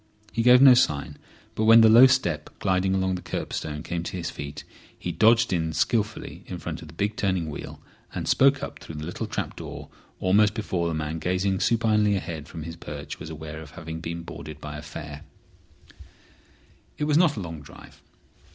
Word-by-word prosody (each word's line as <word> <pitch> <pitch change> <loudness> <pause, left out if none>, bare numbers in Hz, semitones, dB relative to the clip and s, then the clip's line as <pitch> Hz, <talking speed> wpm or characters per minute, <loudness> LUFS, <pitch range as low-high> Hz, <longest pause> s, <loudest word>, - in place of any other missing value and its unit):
He 115 - -1
gave 125 +2 +7
no 135 -2 +10
sign; 75 -12 +1 0.3
but 110 - -1
when 115 +1 +8
the 110 - +7
low 120 +4 +9
step 90 - 0
gliding 95 0 +1
along 95 0 0
the 90 - -4
curbstone 75 -3 -4
came 85 -1 -3
to 90 - -5
his 85 - -4
feet 70 +1 -7 0.3
he - - -4
dodged 115 0 +4
in 80 -2 -1
skilfully 105 +6 -1
in - - -5
front - - -6
of 80 - -10
the 80 - -13
big 100 +5 -1
turning 95 -5 -1
wheel, - - -8 0.4
and - - -3
spoke 140 +1 +4
up - - -6
through 80 - -10
the 75 0 -5
little 85 - -4
trap - - -4
door - - -8 0.3
almost 105 +3 +3
before 95 -6 -1
the 80 - -2
man 80 +1 -3
gazing 95 +2 0
supinely 110 -3 +2
ahead 80 -5 -5
from 80 - -8
his 85 +1 -7
perch 75 -3 -8
was - - -8
aware 80 0 -7
of 80 - -11
having 80 -1 -6
been 85 +1 -5
boarded 75 -2 -9
by 75 0 -7
a 75 - -7
fare. 75 -1 -8 1.8
It 150 - -2
was 150 0 +2
not 170 -5 +4
a - - -3
long 80 -3 -7
drive. - - -15
90 Hz, 195 wpm, -25 LUFS, 80-110 Hz, 1.8 s, no